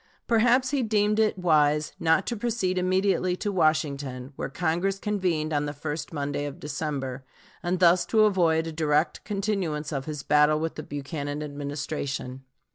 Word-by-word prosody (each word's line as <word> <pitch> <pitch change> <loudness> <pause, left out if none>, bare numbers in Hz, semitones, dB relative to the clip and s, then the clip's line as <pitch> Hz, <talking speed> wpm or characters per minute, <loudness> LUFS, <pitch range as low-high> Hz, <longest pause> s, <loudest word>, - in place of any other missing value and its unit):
Perhaps 245 +3 +3
he 280 -2 +1
deemed 210 -2 +2
it 215 -3 +2
wise 150 -4 +2
not 165 +3 +3
to 240 - -2
proceed 205 -5 -1
immediately 185 0 +1
to 205 +2 -3
Washington, 145 -6 0
where - - -4
Congress 175 +6 0
convened 180 -7 -1
on 145 0 0
the 145 - -4
first 150 +1 -5
Monday 145 -1 -2
of 145 -1 -7
December, 140 -3 -4 0.4
and 175 +2 0
thus 175 0 +5
to 220 -1 +4
avoid 170 -5 +2
a 165 - -4
direct 155 0 0
continuance 195 -8 -2
of 135 -3 -3
his 150 -3 -5
battle 150 +2 +4
with 165 +1 -2
the - - -6
Buchanan 145 0 -5
Administration. 140 -2 -4
160 Hz, 160 wpm, -26 LUFS, 145-190 Hz, 0.4 s, thus